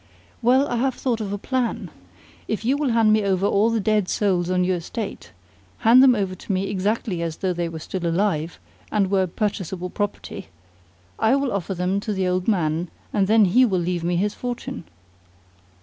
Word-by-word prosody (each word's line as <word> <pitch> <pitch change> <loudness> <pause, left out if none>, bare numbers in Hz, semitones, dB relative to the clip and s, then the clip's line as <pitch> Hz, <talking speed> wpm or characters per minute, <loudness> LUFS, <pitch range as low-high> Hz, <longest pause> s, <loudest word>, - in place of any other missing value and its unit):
"Well, 260 +4 +4
I 240 - -2
have 260 +2 0
thought 235 -4 -1
of 200 -2 -4
a 205 - -2
plan. 250 +3 -2 0.6
If 220 0 -3
you 260 +4 +3
will 290 -2 0
hand 225 -2 +4
me 215 - +3
over 195 -1 +1
all 205 +2 +3
the 230 -1 0
dead 210 -2 +1
souls 180 -4 +1
on 180 0 +2
your 180 0 +1
estate 175 - -6 0.5
hand 235 +3 +6
them 260 -2 +6
over 195 -3 -1
to 185 - -7
me 190 +1 -1
exactly 200 -2 -1
as 165 -2 -3
though 190 -2 -1
they 175 -1 -2
were 165 - -7
still 170 +2 -4
alive, 170 -2 0 0.3
and 200 -2 +1
were 190 -2 +2
purchasable 185 -2 -3
property 205 -1 -4 0.7
I 225 +4 +4
will 275 -4 0
offer 195 -1 -2
them 180 +3 0
to 210 +1 -3
the 190 -1 0
old 180 0 -1
man, 170 -4 0 0.2
and 195 -2 +2
then 220 0 +5
he 235 +8 +4
will 200 -7 +2
leave 175 -1 -1
me 175 +1 0
his 205 +4 0
fortune." 240 - -5
200 Hz, 195 wpm, -23 LUFS, 180-225 Hz, 0.7 s, hand